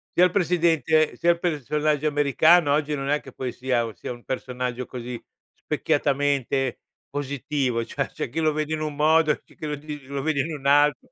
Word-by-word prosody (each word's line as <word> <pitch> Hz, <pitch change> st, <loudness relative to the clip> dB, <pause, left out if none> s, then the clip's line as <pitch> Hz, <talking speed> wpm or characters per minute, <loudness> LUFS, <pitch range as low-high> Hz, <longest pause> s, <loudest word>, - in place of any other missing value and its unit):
sia 180 Hz, -, +6 dB
il 180 Hz, -, +1 dB
presidente 165 Hz, -4 st, +2 dB
sia 170 Hz, -, +4 dB
il 170 Hz, -, -2 dB
personaggio 150 Hz, -2 st, 0 dB
americano 145 Hz, +2 st, +4 dB
oggi, 150 Hz, +1 st, +1 dB
non 135 Hz, -1 st, -3 dB
è 150 Hz, +1 st, +2 dB
che 135 Hz, -, -13 dB
poi 125 Hz, 0 st, -4 dB
sia 125 Hz, -1 st, 0 dB
u 115 Hz, -, -7 dB
sia 90 Hz, -, -7 dB
un 120 Hz, -1 st, -9 dB
personaggio 125 Hz, -1 st, -4 dB
così 125 Hz, -1 st, -6 dB, 0.4 s
specchiatamente 140 Hz, -2 st, 0 dB, 0.3 s
positivo, 140 Hz, -3 st, -2 dB
cioè 135 Hz, +4 st, -2 dB
c'è -, -, -5 dB
chi 150 Hz, +7 st, -3 dB
lo 155 Hz, -1 st, +2 dB
vede 155 Hz, +1 st, -2 dB
in 155 Hz, -, -2 dB
un 155 Hz, -1 st, -3 dB
modo, 155 Hz, +1 st, +4 dB
c'è -, -, -23 dB
chi -, -, -7 dB
lo 150 Hz, -, -2 dB
li 150 Hz, 0 st, -7 dB
lo 140 Hz, +1 st, -4 dB
vede 150 Hz, -1 st, +1 dB
in 160 Hz, +4 st, -4 dB
un 140 Hz, -2 st, -11 dB
alt 145 Hz, -1 st, +5 dB
145 Hz, 200 wpm, -24 LUFS, 130-155 Hz, 0.4 s, sia